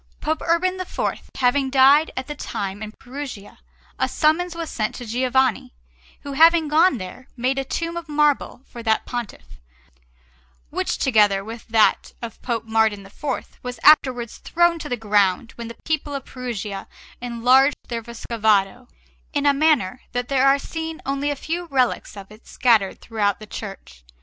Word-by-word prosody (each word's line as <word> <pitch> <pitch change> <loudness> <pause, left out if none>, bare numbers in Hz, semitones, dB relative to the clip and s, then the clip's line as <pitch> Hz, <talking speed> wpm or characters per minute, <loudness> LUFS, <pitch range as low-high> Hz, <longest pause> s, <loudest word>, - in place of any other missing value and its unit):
Pope 315 +1 -2
Urban 365 +2 +1
IV 370 - -3
having 265 +1 +2
died 275 +4 +5
at 260 - -2
that 295 +1 -8
time 200 +1 -4
in 215 0 -6
Perugia, 255 -5 -8 0.4
a - - +1
summons 335 +3 +1
was 335 -1 -5
sent 215 -2 -2
to 245 - -7
Giovanni, 250 - 0 0.5
who, 280 - -6
having 325 +2 +5
gone 315 0 +4
there, 220 +6 -9
made 260 +3 0
a - - -1
tomb 335 +5 -3
of 340 -2 -6
marble 295 -4 +1
for 235 - -10
that 220 -1 +1
Pontiff, 225 - -7 1.1
which, - - -1
together 210 -6 +3
with 225 +2 -9
that 225 -2 +2
of 235 -1 -8
Pope 235 -3 -2
Martin 220 -3 +1
IV, 265 +7 -5
was 250 -2 -6
afterwards 255 -6 +4
thrown 345 0 +2
to - - -6
the 245 - -1
ground 210 0 +1
when 235 -1 -8
the 230 - -9
people 300 -2 -2
of 275 - -5
Perugia 215 -6 -5 0.3
enlarged 250 +4 +3
their 235 -1 -3
Vescovado, 225 -1 0 0.5
in 290 -1 0
a 285 - +5
manner 275 -8 +2
that 245 0 -2
there 270 -1 +3
are 275 +1 +5
seen 320 +2 -5
only 275 +1 -1
a 290 - -1
few 335 +5 -4
relics 260 -8 0
of 195 0 -10
it 215 +1 -16
scattered 220 -6 +2
throughout 205 -3 0
the 215 - -9
church. 195 - -9
250 Hz, 165 wpm, -22 LUFS, 220-290 Hz, 1.1 s, died